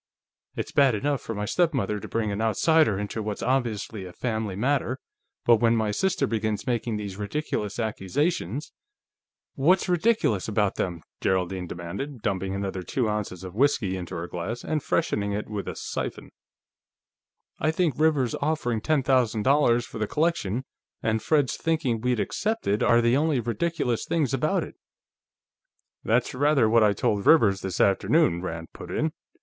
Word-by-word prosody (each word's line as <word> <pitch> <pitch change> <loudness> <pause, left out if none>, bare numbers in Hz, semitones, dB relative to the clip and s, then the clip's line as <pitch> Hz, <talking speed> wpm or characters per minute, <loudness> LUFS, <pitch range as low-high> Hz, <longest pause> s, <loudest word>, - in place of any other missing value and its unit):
It's - - -4
bad 135 -5 +4
enough 140 +6 -1
for 115 - -5
my 105 0 -2
stepmother 125 - +1
to - - -8
bring 110 -2 -1
an 100 +2 -2
outsider 115 - +3
into 105 +2 -3
what's 105 -1 -4
obviously 115 -5 -1
a 90 - -8
family 110 -3 -2
matter, 130 +3 0 0.5
but 120 -1 +6
when 115 +1 +3
my 110 -2 +1
sister 170 - +1
begins 110 -4 -2
making 115 -2 -1
these 100 -2 -6
ridiculous 105 -1 -3
accusations 115 - -1 0.4
..." - - -68
"What's 175 +8 +3
ridiculous 180 - +2
about 105 -2 +1
them?" 85 -3 -3 0.2
Geraldine 95 -1 0
demanded, 95 - -6
dumping 95 -2 -1
another 95 -1 -3
two 120 +6 -1
ounces 105 -4 -3
of 90 -1 -7
whiskey 115 -5 +2
into 90 0 -6
her 85 +1 -4
glass 95 +8 -5
and 155 -1 -1
freshening 100 -5 0
it 105 +1 -3
with 105 -2 -4
the - - -5
siphon. - - -5 1.3
"I 155 - +1
think 160 -1 +1
Rivers's 150 -6 +2
offering 140 -7 0
ten 150 0 +1
thousand 125 -5 +2
dollars 120 -3 +3
for - - -8
the 110 - 0
collection, 140 - 0 0.4
and 110 0 +1
Fred's 145 -2 +1
thinking 150 -9 0
we'd 125 -1 +1
accept 220 - -1
it, 105 +2 +1
are 120 0 +5
the 120 +1 +3
only 150 -1 +2
ridiculous 120 +2 -1
things 150 -5 0
about 155 +7 +1
it." - - -9 1.3
"That's 120 +2 +1
rather 140 -2 +3
what 115 +1 +4
I 105 -1 +4
told 100 0 0
Rivers, 100 - +5
this 95 -2 -4
afternoon," 100 - +3
Rand 80 -2 -6
put - - -10
in. - - 0
115 Hz, 165 wpm, -26 LUFS, 100-140 Hz, 1.3 s, but